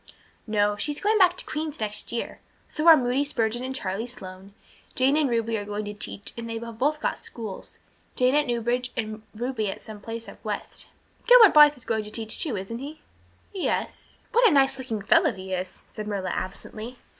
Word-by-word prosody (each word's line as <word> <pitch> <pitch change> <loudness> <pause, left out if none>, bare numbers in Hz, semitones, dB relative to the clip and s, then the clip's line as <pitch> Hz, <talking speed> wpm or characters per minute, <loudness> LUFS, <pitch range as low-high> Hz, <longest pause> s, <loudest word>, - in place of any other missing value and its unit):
"No, 205 -1 +1
she 295 - -1
is 290 - -4
going 430 +1 +2
back 370 -2 +5
to - - -2
Queen's 305 -1 -4
next 210 -1 -3
year. 235 - -4 0.3
So 305 +2 -2
are 325 -1 +10
Moody 255 +1 +1
Spurgeon 240 -4 -1
and 260 +1 -4
Charlie 200 0 -3
Sloane. 195 -4 -11 0.4
Jane 265 +2 +3
and 300 -3 +2
Ruby 230 -1 0
are - - -5
going 205 +1 -4
to 205 - -5
teach 205 -1 -5
and 230 0 -6
they 230 - -3
have 230 -1 -8
both 300 +3 +1
got - - -2
schools 220 -5 -8 0.4
Jane 255 +1 +3
at 295 0 +3
Newbridge 240 +1 -1
and 215 -2 -3
Ruby 230 -2 -2
at - - -5
some 215 -2 -10
place 230 +1 -6
up - - -13
west." - - -5 0.4
"Gilbert 485 -4 +9
Blythe 295 -1 +8
is 250 - -11
going 220 -1 -1
to 210 - -6
teach 220 0 -2
too, 265 -10 0
isn't 195 +5 -5
he?" 295 +3 -8 0.5
"Yes" 380 - -3
briefly. 480 - +3
"What 475 - +7
a - - +1
nice 270 -1 +4
looking 225 -6 -4
fellow 330 - +4
he 190 -1 -7
is," 185 0 -5
said 210 -1 -5
Marilla 195 -3 -2
absently. 215 +5 -6
235 Hz, 210 wpm, -26 LUFS, 210-285 Hz, 0.5 s, are